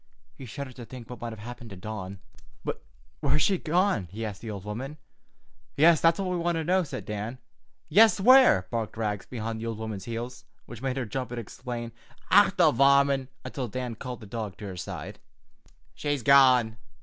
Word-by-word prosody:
He 130 Hz, -, -10 dB
shuddered 130 Hz, +3 st, -7 dB
to 120 Hz, -, -8 dB
think 125 Hz, -1 st, -10 dB
what 125 Hz, -, -9 dB
might 120 Hz, -, -3 dB
have 110 Hz, -, -8 dB
happened 120 Hz, +2 st, -9 dB
to 100 Hz, -, -8 dB
Dawn. 95 Hz, -1 st, -7 dB, 0.4 s
"But -, -, -3 dB, 0.4 s
where -, -, 0 dB
has 155 Hz, -, +3 dB
she 190 Hz, -3 st, +2 dB
gone?" 175 Hz, -, +1 dB
he 110 Hz, +3 st, -4 dB
asked 100 Hz, -3 st, -6 dB
the 115 Hz, -, -7 dB
old 100 Hz, -2 st, -6 dB
woman. 130 Hz, +8 st, -5 dB, 0.8 s
"Yes, 160 Hz, +2 st, +6 dB
that's 165 Hz, 0 st, +4 dB
what 195 Hz, -, -1 dB
we 180 Hz, -, 0 dB
want 170 Hz, 0 st, 0 dB
to 160 Hz, -, -1 dB
know," 185 Hz, +4 st, +3 dB
said 145 Hz, -6 st, -6 dB
Dan. 105 Hz, +4 st, -4 dB, 0.5 s
"Yes, 220 Hz, 0 st, +6 dB
where!" 250 Hz, -, +7 dB
barked 115 Hz, -2 st, -3 dB
Rags 105 Hz, -3 st, -2 dB
behind 115 Hz, -2 st, -4 dB
the 115 Hz, -, -4 dB
old 115 Hz, -2 st, -3 dB
woman's 110 Hz, -3 st, -5 dB
heels, 120 Hz, +2 st, -5 dB, 0.2 s
which 120 Hz, -2 st, -10 dB
made 135 Hz, 0 st, -2 dB
her 130 Hz, -, -1 dB
jump 130 Hz, +4 st, -4 dB
and 120 Hz, 0 st, -5 dB
exclaim, 120 Hz, +1 st, -6 dB, 0.4 s
"Och, -, -, +6 dB
the -, -, +6 dB
varmint!" 140 Hz, 0 st, +4 dB, 0.2 s
until 130 Hz, -3 st, -4 dB
Dan 125 Hz, +1 st, -4 dB
called 125 Hz, +2 st, -7 dB
the -, -, -9 dB
dog 105 Hz, -2 st, -5 dB
to 105 Hz, -, -8 dB
his 95 Hz, -3 st, -6 dB
side. -, -, -7 dB, 0.7 s
"She's 145 Hz, -4 st, -2 dB
gone. 125 Hz, -4 st, +5 dB
120 Hz, 200 wpm, -27 LUFS, 110-140 Hz, 0.8 s, where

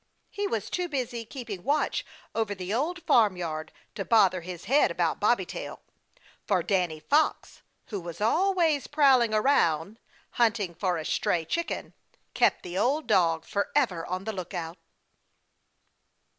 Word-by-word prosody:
He 405 Hz, 0 st, -2 dB
was -, -, -3 dB
too 360 Hz, -1 st, -2 dB
busy 245 Hz, -5 st, -3 dB
keeping 220 Hz, -7 st, -7 dB
watch 295 Hz, +5 st, 0 dB, 0.3 s
over 220 Hz, -3 st, -1 dB
the 185 Hz, +1 st, -4 dB
Old 330 Hz, +8 st, -1 dB
Farmyard 175 Hz, -8 st, +1 dB, 0.2 s
to 195 Hz, -, -4 dB
bother 190 Hz, -5 st, +4 dB
his 175 Hz, 0 st, -8 dB
head 285 Hz, +4 st, +4 dB
about -, -, -1 dB
Bobby -, -, +2 dB
Tail, -, -, -7 dB, 0.7 s
for -, -, +2 dB
Danny 180 Hz, -6 st, 0 dB
Fox, 295 Hz, -, 0 dB, 0.3 s
who 205 Hz, -4 st, -4 dB
was 170 Hz, -1 st, -8 dB
always 325 Hz, -, +2 dB
prowling 270 Hz, -6 st, +4 dB
around, 215 Hz, -, +2 dB, 0.3 s
hunting 220 Hz, -6 st, +1 dB
for 180 Hz, 0 st, -1 dB
a 160 Hz, -, -5 dB
stray 165 Hz, 0 st, 0 dB
chicken, 340 Hz, -, -3 dB, 0.4 s
kept -, -, +2 dB
the 180 Hz, +1 st, -4 dB
old 285 Hz, +8 st, +1 dB
dog 165 Hz, -2 st, +2 dB
forever 200 Hz, -, 0 dB
on 185 Hz, +1 st, -3 dB
the 220 Hz, +2 st, -4 dB
lookout. 175 Hz, -2 st, -6 dB
210 Hz, 140 wpm, -27 LUFS, 180-275 Hz, 0.7 s, bother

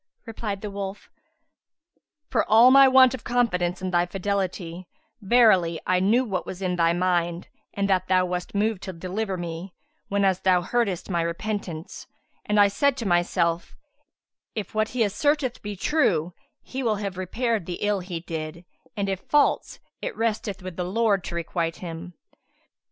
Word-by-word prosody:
Replied 215 Hz, -3 st, -5 dB
the 210 Hz, -, -5 dB
wolf, 200 Hz, 0 st, -6 dB, 1.2 s
"For 230 Hz, -, +2 dB
all 230 Hz, +4 st, +7 dB
my 275 Hz, 0 st, +8 dB
want 260 Hz, -1 st, +6 dB
of 260 Hz, -, -6 dB
confidence 185 Hz, -7 st, 0 dB
in 185 Hz, -, -2 dB
thy 175 Hz, 0 st, +2 dB
fidelity, 185 Hz, -2 st, -3 dB, 0.3 s
verily 195 Hz, -7 st, +4 dB
I 185 Hz, 0 st, +2 dB
knew 225 Hz, +7 st, +3 dB
what 190 Hz, -6 st, -2 dB
was 185 Hz, -, -7 dB
in 185 Hz, -2 st, -1 dB
thy 170 Hz, -1 st, +3 dB
mind 175 Hz, -1 st, 0 dB, 0.3 s
and 200 Hz, 0 st, 0 dB
that 185 Hz, -1 st, +1 dB
thou 185 Hz, 0 st, +3 dB
wast 180 Hz, +2 st, -4 dB
moved 210 Hz, -1 st, 0 dB
to 190 Hz, -, -6 dB
deliver 190 Hz, +3 st, -3 dB
me 175 Hz, +1 st, -6 dB, 0.3 s
whenas 195 Hz, -2 st, +1 dB
thou 185 Hz, -2 st, +3 dB
heardest 200 Hz, -4 st, -1 dB
my 170 Hz, -1 st, +1 dB
repentance, 170 Hz, -1 st, -4 dB, 0.4 s
and 210 Hz, 0 st, +2 dB
I 205 Hz, -, +7 dB
said 270 Hz, +7 st, +1 dB
to 230 Hz, -, -4 dB
myself, 175 Hz, -2 st, +1 dB, 0.8 s
'If 210 Hz, -4 st, -5 dB
what 215 Hz, 0 st, +1 dB
he 235 Hz, 0 st, +1 dB
asserteth 260 Hz, +5 st, 0 dB
be 205 Hz, 0 st, -5 dB
true, 180 Hz, -, +1 dB, 0.3 s
he 265 Hz, -, -5 dB
will 225 Hz, -4 st, +1 dB
have 200 Hz, -2 st, -4 dB
repaired 215 Hz, +2 st, -2 dB
the 175 Hz, -, -4 dB
ill 205 Hz, -1 st, +1 dB
he 175 Hz, -2 st, -6 dB
did; 165 Hz, +1 st, -6 dB, 0.3 s
and 200 Hz, -1 st, -1 dB
if 195 Hz, -1 st, -2 dB
false, 295 Hz, +6 st, +1 dB, 0.2 s
it -, -, -4 dB
resteth 210 Hz, -4 st, -2 dB
with 185 Hz, -2 st, -7 dB
the 180 Hz, -, -1 dB
Lord 200 Hz, 0 st, +1 dB
to 170 Hz, -, -5 dB
requite 170 Hz, 0 st, -2 dB
him.' 170 Hz, 0 st, -8 dB
190 Hz, 165 wpm, -25 LUFS, 175-220 Hz, 1.2 s, my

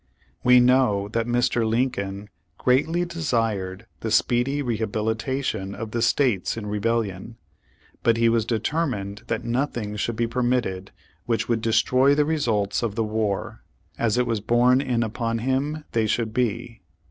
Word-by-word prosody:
We 125 Hz, 0 st, +7 dB
know 125 Hz, -5 st, +3 dB
that 115 Hz, +1 st, -1 dB
Mr. 120 Hz, -1 st, +1 dB
Lincoln 110 Hz, -4 st, -1 dB, 0.3 s
greatly 160 Hz, +8 st, +2 dB
desired 115 Hz, -, -2 dB
the 115 Hz, -, -3 dB
speedy 125 Hz, +6 st, +1 dB
rehabilitation 110 Hz, -1 st, -2 dB
of 110 Hz, 0 st, -6 dB
the 115 Hz, -, -1 dB
states 115 Hz, -4 st, +1 dB
in 110 Hz, -, -5 dB
rebellion, 105 Hz, 0 st, -2 dB, 0.6 s
but 115 Hz, -1 st, +3 dB
he 115 Hz, 0 st, +3 dB
was 115 Hz, -1 st, +3 dB
determined 110 Hz, -3 st, -2 dB
that 115 Hz, -, -2 dB
nothing 120 Hz, -4 st, -2 dB
should 115 Hz, +2 st, -2 dB
be 115 Hz, +1 st, 0 dB
permitted 120 Hz, -6 st, -1 dB, 0.4 s
which 115 Hz, -2 st, 0 dB
v/ould 115 Hz, -2 st, 0 dB
destroy 125 Hz, +5 st, +3 dB
the 150 Hz, 0 st, +3 dB
results 115 Hz, -11 st, 0 dB
of 115 Hz, -4 st, -2 dB
the 115 Hz, -, 0 dB
war, 105 Hz, -2 st, -2 dB, 0.4 s
as 115 Hz, -1 st, +1 dB
it 125 Hz, -, +2 dB
was 115 Hz, -3 st, -1 dB
borne 120 Hz, +4 st, +3 dB
in 125 Hz, -4 st, 0 dB
upon 115 Hz, +1 st, -2 dB
him 135 Hz, +6 st, -1 dB
they 115 Hz, -1 st, +1 dB
should 110 Hz, 0 st, -1 dB
be. 115 Hz, -2 st, -2 dB
115 Hz, 145 wpm, -24 LUFS, 110-125 Hz, 0.6 s, We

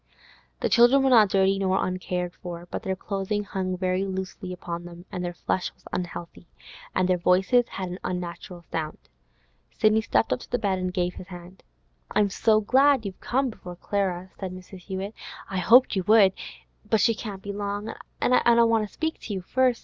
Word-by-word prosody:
The -, -, +1 dB
children 245 Hz, +3 st, +6 dB
were 265 Hz, -, +3 dB
not 220 Hz, -5 st, +7 dB
dirty 195 Hz, 0 st, +3 dB
nor 190 Hz, 0 st, +1 dB
uncared 180 Hz, -1 st, -3 dB
for, 175 Hz, -1 st, -7 dB
but -, -, -3 dB
their 190 Hz, 0 st, -2 dB
clothing 200 Hz, +2 st, -2 dB
hung 185 Hz, -2 st, -3 dB
very 185 Hz, +1 st, 0 dB
loosely 190 Hz, 0 st, -5 dB
upon 175 Hz, -1 st, -5 dB
them; 175 Hz, 0 st, -11 dB
their 180 Hz, -1 st, -3 dB
flesh 180 Hz, +1 st, -2 dB
was -, -, -29 dB
unhealthy, 175 Hz, -1 st, -5 dB, 0.6 s
their 180 Hz, -1 st, +2 dB
voices 190 Hz, +8 st, +3 dB
had 185 Hz, -2 st, -5 dB
an 180 Hz, +2 st, -6 dB
unnatural 175 Hz, 0 st, -5 dB
sound. 160 Hz, -2 st, -3 dB, 0.8 s
Sidney 215 Hz, 0 st, +4 dB
stepped 115 Hz, -, +1 dB
up 125 Hz, -, -2 dB
to -, -, -12 dB
the 245 Hz, -, +1 dB
bed 200 Hz, -5 st, 0 dB
and 185 Hz, 0 st, -2 dB
gave 180 Hz, -1 st, -1 dB
his 180 Hz, -, -10 dB
hand. 180 Hz, 0 st, -11 dB, 0.5 s
'I'm 205 Hz, -2 st, +3 dB
so 215 Hz, +1 st, +3 dB
glad 265 Hz, +2 st, +4 dB
you've 195 Hz, -2 st, -6 dB
come 265 Hz, 0 st, 0 dB
before 180 Hz, -4 st, -10 dB
Clara,' 185 Hz, -1 st, -2 dB
said 190 Hz, -2 st, -4 dB
Mrs. 185 Hz, +1 st, -11 dB
Hewett. 190 Hz, +3 st, -5 dB, 0.4 s
'I 190 Hz, -, -1 dB
hoped 240 Hz, +8 st, +6 dB
you 190 Hz, -, +1 dB
would. 210 Hz, -3 st, +6 dB, 0.6 s
But 220 Hz, -, +3 dB
she 230 Hz, +2 st, +4 dB
can't 205 Hz, -3 st, -7 dB
be 200 Hz, -, -5 dB
long, 205 Hz, +1 st, -3 dB, 0.3 s
an' 250 Hz, -, +2 dB
I 235 Hz, -1 st, +5 dB
want 225 Hz, -2 st, +2 dB
to -, -, -24 dB
speak 320 Hz, 0 st, -3 dB
to 215 Hz, -, -6 dB
you 190 Hz, -, -3 dB
first. 255 Hz, +4 st, +2 dB
190 Hz, 190 wpm, -26 LUFS, 180-215 Hz, 0.8 s, not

